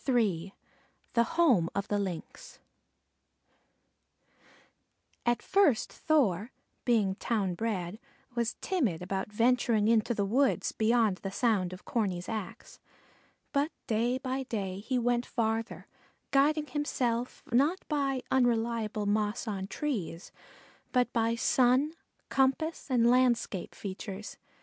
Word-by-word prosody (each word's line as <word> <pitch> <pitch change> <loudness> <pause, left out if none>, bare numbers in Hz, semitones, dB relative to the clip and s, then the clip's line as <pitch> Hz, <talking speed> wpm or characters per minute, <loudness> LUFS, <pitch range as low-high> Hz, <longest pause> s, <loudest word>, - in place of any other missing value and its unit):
III 195 -8 +1 0.6
THE 235 - +4 0.2
HOME 240 - +4
OF 200 0 -1
THE 205 - 0
LYNX 185 -5 -6 2.7
At 240 0 +2
first 350 - +3
Thor, 240 - +1 0.3
being 215 -6 +3
town 200 -3 -1
bred, 195 -1 -3 0.3
was 235 0 -1
timid 240 - 0
about 190 +2 -3
venturing 230 -1 +2
into 230 +1 +3
the 200 - 0
woods 260 +7 +2
beyond 220 -3 +2
the 195 - -5
sound 195 -4 +1
of 185 +1 -10
Corney's 190 -6 -1
axe; 215 -4 -6 0.7
but 285 +1 +2 0.2
day 235 +3 +1
by 260 0 -3
day 195 -7 -3
he 250 +5 -1
went 240 0 +1
farther, 225 -2 -2 0.5
guiding 295 +2 +3
himself, 250 -5 -2
not 290 +10 +2
by 275 -4 0
unreliable 230 -4 +1
moss 210 +3 0
on 195 -3 -3
trees, 200 - -4 0.6
but 250 -2 +1
by 230 0 +2
sun, 255 +5 +3 0.3
compass, 270 +5 +1
and 240 -3 +4
landscape 240 -6 +2
features. 200 +1 -7
230 Hz, 115 wpm, -30 LUFS, 205-255 Hz, 2.7 s, THE